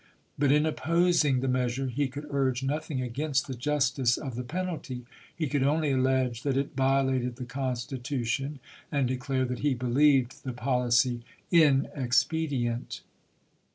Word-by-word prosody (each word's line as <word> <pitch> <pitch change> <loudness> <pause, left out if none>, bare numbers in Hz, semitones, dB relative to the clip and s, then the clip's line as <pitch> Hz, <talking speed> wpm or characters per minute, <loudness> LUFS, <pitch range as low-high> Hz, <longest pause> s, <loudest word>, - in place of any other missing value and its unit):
But 140 -1 +2
in 150 +1 +4
opposing 160 -4 +2
the 135 - -1
measure 125 +1 0
he 135 +3 -1
could 140 +3 -7
urge 135 -2 0
nothing 145 -1 -2
against 135 +2 -1
the 135 - -5
Justice 135 -1 +1
of 135 -4 -5
the 120 - -4
penalty; 150 -5 -4 0.3
he 165 - -1
could 145 0 0
only 150 +2 +2
allege 130 -2 +1
that 135 -1 0
it 140 0 -2
violated 130 -2 +1
the 125 0 -6
Constitution, 130 +2 -3 0.3
and 140 -3 +1
declare 130 +1 -1
that 125 -1 -4
he 145 -2 +1
believed 130 +1 +2
the 130 - -4
policy 125 -1 +1 0.3
inexpedient. 135 -4 +1
135 Hz, 140 wpm, -28 LUFS, 125-145 Hz, 0.3 s, in